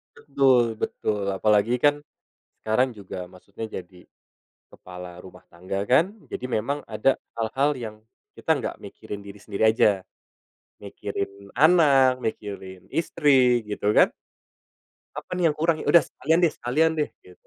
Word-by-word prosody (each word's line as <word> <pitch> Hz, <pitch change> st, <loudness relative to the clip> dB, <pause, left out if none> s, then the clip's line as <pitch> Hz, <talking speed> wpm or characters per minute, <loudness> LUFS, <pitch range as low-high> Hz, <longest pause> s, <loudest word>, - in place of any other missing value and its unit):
Betul, 125 Hz, -, +2 dB
betul. 105 Hz, -2 st, -2 dB
Apalagi 105 Hz, +4 st, +2 dB
kan, 145 Hz, +3 st, +2 dB, 0.6 s
sekarang 120 Hz, +4 st, +2 dB
juga 95 Hz, -2 st, -8 dB
maksudnya 100 Hz, +4 st, -9 dB
jadi 90 Hz, 0 st, -16 dB, 0.6 s
kepala 90 Hz, -1 st, -11 dB
rumah 90 Hz, -1 st, -13 dB
tangga, 95 Hz, +3 st, -4 dB
kan. 165 Hz, +11 st, +3 dB, 0.2 s
Jadi 125 Hz, -, -4 dB
memang 130 Hz, +5 st, -2 dB
ada 135 Hz, -, +1 dB, 0.2 s
hal-hal 130 Hz, +6 st, +1 dB
yang 110 Hz, -3 st, -7 dB, 0.4 s
kita -, -, -5 dB
nggak -, -, -4 dB
mikirin 105 Hz, -, -9 dB
diri 100 Hz, +1 st, -10 dB
sendiri 105 Hz, 0 st, -2 dB
aja. 100 Hz, -4 st, +2 dB, 0.8 s
Mikirin 100 Hz, 0 st, -6 dB
anak, 140 Hz, -4 st, +5 dB
mikirin 95 Hz, -4 st, -6 dB
istri, 130 Hz, -7 st, +3 dB
gitu 105 Hz, 0 st, -1 dB
kan? -, -, +5 dB, 1.1 s
Apa -, -, -20 dB
nih 175 Hz, -, +2 dB
yang 150 Hz, -, 0 dB
kurang? 160 Hz, 0 st, +1 dB
Ya -, -, -6 dB
udah 170 Hz, -, +6 dB
sekalian 165 Hz, +2 st, 0 dB
deh, 165 Hz, -, +4 dB
sekalian 155 Hz, +7 st, +1 dB
deh 150 Hz, -, 0 dB
gitu. 90 Hz, -, -19 dB
115 Hz, 135 wpm, -24 LUFS, 100-140 Hz, 1.1 s, udah